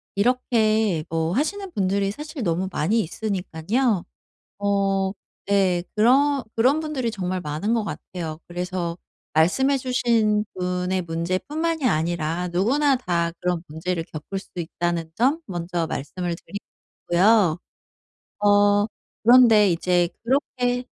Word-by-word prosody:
이렇게 220 -6 +2
뭐 165 0 -1
하시는 370 - -1
분들이 195 - 0
사실 300 +2 -7
너무 180 +1 0
많이 195 +6 +1
있으니깐요. 200 +3 -1 0.6
어 195 -1 +1 0.3
네. 190 -3 +2
그런 270 +5 +4
그런 260 +7 +3
분들이 275 -7 -2
정말 185 -2 -3
많은 155 +10 -1
것 225 -2 0
같아요. 165 -5 -6
그래서 175 -1 -3 0.4
말씀해 265 - +3
주신 230 -5 +1
분의 180 0 -1
문제뿐만이 255 - -2
아니라 170 -1 0
누구나 260 +11 +2
다 170 -7 -1
그런 180 -2 -1
문제를 165 +2 -3
겪을 165 +6 -6
수 - - -17
있다는 170 -1 -3
점 270 - +2
먼저 175 -1 -3
말씀을 175 +4 -4
드리고 200 - -8 0.4
싶고요. 180 -1 +4 0.9
어. 205 0 +5 0.4
그런데 225 -5 +7
이제 175 0 +1
그렇게 250 -1 0
195 Hz, 265 characters per minute, -23 LUFS, 175-240 Hz, 0.9 s, 그런데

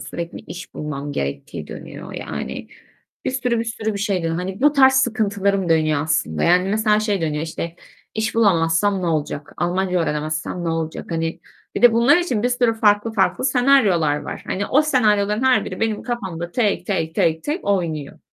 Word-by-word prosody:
Sürekli 170 0 -6
iş 180 0 -10
bulmam 145 -1 -5
gerektiği 70 - -4
dönüyor. - - -9
Yani, - - -6 0.6
bir - - 0
sürü 250 -2 0
bir 230 - -1
sürü 225 -1 -3
bir 200 - -3
şey 200 -2 0
dönüyor. 165 0 -1
Hani 185 +3 -4
bu 295 +2 +5
tarz 265 -2 +6
sıkıntılarım 200 -6 +1
dönüyor 155 -3 +2
aslında, 150 - -1
yani, 180 +2 +3
mesela 215 +1 +2
şey 205 -3 0
dönüyor 155 -2 -1
işte; 165 +1 -5 0.4
"İş 220 0 -1
bulamazsam 195 -2 +2
ne - - -1
olacak, 150 -3 -2
Almanca 180 +1 0
öğrenemezsem 155 +2 -2
ne - - -1
olacak?" 165 -1 -3
Hani, 165 +1 -2 0.3
bir - - -3
de 245 -2 +8
bunlar 235 +6 +5
için 260 -12 0
bir 245 - +2
sürü 245 -2 +1
farklı 210 0 +2
farklı 210 +4 +1
senaryolar 230 - +3
var. - - -6
Hani, 200 +2 -2
o 295 +4 +4
senaryoların 210 -6 +2
her 260 -1 +3
biri - - -7
benim 225 -1 -1
kafamda 190 -8 -4
tek, 220 -5 0
tek, 165 -5 -1
tek, 160 0 +1
tek 310 +6 -3
oynuyor. 165 -8 -2
195 Hz, 180 wpm, -21 LUFS, 165-225 Hz, 0.6 s, de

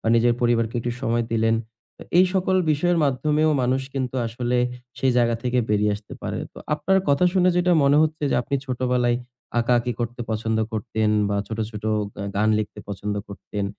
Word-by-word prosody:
বা - - -2
নিজের 120 +1 +3
পরিবারকে 115 -2 +1
একটু 120 +1 -2
সময় 115 0 +1
দিলেন। 115 0 +2 0.4
তো - - -9 0.2
এই 185 - +8
সকল 190 0 +2
বিষয়ের 170 +4 +2
মাধ্যমেও 150 +3 +2
মানুষ 130 +2 +1
কিন্তু 130 -1 -2
আসলে 120 +2 -2 0.4
সেই 130 -1 +2
জায়গা 120 -1 +3
থেকে 125 0 0
বেরিয়ে 105 0 +2
আসতে 105 +1 -14
পারে। - - -3
তো - - -12 0.2
আপনার 190 +6 +2
কথা 140 +5 +3
শুনে 185 -1 +3
যেটা 180 0 +3
মনে 140 +1 +5
হচ্ছে 155 0 -1
যে - - +1
আপনি 140 - -3
ছোটবেলায় 125 -1 +1 0.4
আঁকাআঁকি 120 +1 +1
করতে 120 +1 -3
পছন্দ 110 0 -1
করতেন 110 -1 -1 0.2
বা 100 - 0
ছোট, 110 - -6
ছোট 105 -2 -8 0.4
আ - - -4
গান 105 +2 +2
লিখতে 105 -1 -4
পছন্দ 100 +1 -3
করতেন। 100 0 -5
120 Hz, 185 wpm, -23 LUFS, 110-140 Hz, 0.4 s, এই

